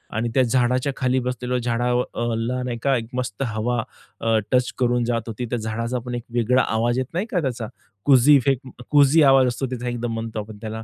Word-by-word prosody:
आणि 115 +1 0
त्या 130 - +4
झाडाच्या 125 +2 +1
खाली 130 0 +1
बसलेलो 125 0 -2
झाडा 120 0 -1
अ, 120 -1 -1
ला 125 +3 -2
नाही 125 -2 -3
का 140 -1 +3
एक 115 - -4
मस्त 125 -1 -3
हवा 115 +1 -1 0.4
अ, 115 -1 +2
टच 125 -1 +2
करून 120 -1 +2
जात 115 -1 0
होती. 115 +2 -4
त्या 120 +1 -2
झाडाचा 115 +3 -3
पण 125 - -4
एक 120 - -5
वेगळा 125 +2 +3
आवाज 120 +2 +1
येत 130 - -1
नाही 180 +5 -1
का 180 - +1
त्याचा, 120 -6 -3 0.4
कुझी 140 +1 +6
इफेक्ट 135 -1 +1
अं, 125 - -12
कुझी 145 +2 +5
आवाज 135 -2 +6
असतो 125 +2 -2
त्याचा 125 -1 -4
एकदम 120 -1 -3
म्हणतो 115 -1 -4
आपण 105 0 -8
त्याला. 110 0 -5
125 Hz, 215 wpm, -22 LUFS, 115-130 Hz, 0.4 s, कुझी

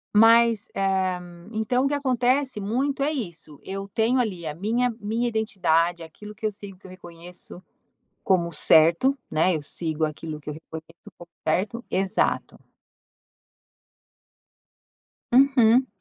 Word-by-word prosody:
Mas 230 0 +5
eh, - - -3 0.7
então 235 +4 0
o - - +3
que 290 - -2
acontece 255 -2 0
muito 265 +8 -1
é 290 +2 +1
isso: 170 - -6
eu 195 +1 -6
tenho 230 +5 +1
ali 190 -8 -2
a 150 - -3
minha 230 +8 0
minha 225 +3 -1
identidade, 175 -7 0
aquilo 210 +6 -11
que 220 - -7
eu 215 - +1
sigo, 200 -2 -10
que 190 - -23
eu 185 - -11
reconheço 175 0 -12 0.6
como 175 -3 +1
certo, 165 - +4
né? 160 +2 +2
Eu 150 - -5
sigo 160 +1 -3
aquilo 155 0 -5
que 150 0 -8
eu - - -6
reconheço 160 +1 -12
como 175 0 -14 0.2
certo. 205 +9 -1
Exato. 190 0 0 2.8
Uhum. 255 -1 +5
200 Hz, 135 wpm, -24 LUFS, 170-240 Hz, 2.8 s, Mas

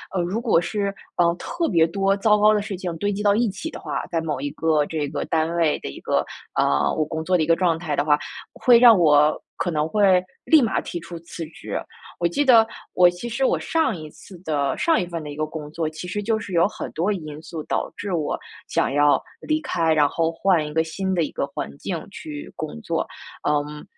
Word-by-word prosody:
呃， 185 - +2
如 180 +6 -1
果 230 -8 +3
是， 200 +3 -2 0.2
呃， 170 -1 +4
特 335 - -2
别 165 -4 +4
多 195 +2 +1
糟 210 +1 +3
糕 210 +1 +6
的 210 - +1
事 200 -2 -5
情 175 -2 -4
堆 205 +5 0
积 205 +1 -3
到 205 -1 +4
一 230 0 +2
起 205 +12 -5
的 - - -9
话， - - -4
在 165 -1 -1
某 155 -4 -3
一 145 +2 -2
个 155 -2 +1
这 150 -1 -2
个 145 +1 -3
单 160 +1 0
位 165 -3 +2
的 - - -6
一 70 - -9
个， - - 0 0.3
呃， 70 0 +2
我 155 - +1
工 160 +1 -4
作 180 +2 +2
的 160 - +1
一 - - 0
个 165 +1 +4
状 170 -2 +1
态 160 -3 -3
的 145 - 0
话， 150 -1 +4 0.4
会 240 -2 +5
让 235 -3 +8
我 150 -3 +4 0.2
可 - - -1
能 155 -2 0
会 190 -1 +4 0.2
立 315 -2 +6
马 230 - +1
提 175 - -5
出 170 0 -9
辞 165 0 -7
职。 160 - -6 0.4
我 170 - +2
记 285 +12 0
得 230 -4 +7 0.3
我 180 -1 +6
其 175 +7 -6
实 235 +3 0
我 - - +2
上 325 -8 0
一 155 -1 -8
次 185 +3 -14
的 145 -4 0
上 330 -2 +2
一 180 - -3
份 170 -2 -5
的 150 - -7
一 - - -7
个 155 +1 -1
工 155 -1 -8
作， 160 0 -2
其 160 +3 -8
实 205 +3 -3
就 220 +1 0
是 205 -3 -8
有 170 +1 +4
很 215 - -7
多 175 +6 0
因 155 -6 -5
素 160 -1 -7
导 - - -2
致 200 -2 -4
我 155 -4 -1 0.3
想 - - 0
要 145 0 +4 0.2
离 310 0 0
开， 165 - 0
然 150 -2 +4
后 165 +3 0
换 170 -2 +2
一 150 - -6
个 160 +1 +2
新 190 +4 -3
的 170 - +2
一 150 - -4
个 - - -2
环 140 - -6
境 170 -4 -4
去 300 +6 -8
工 155 - -6
作。 - - -2 0.4
嗯， 150 0 -1
170 Hz, 260 characters per minute, -23 LUFS, 155-205 Hz, 0.4 s, 让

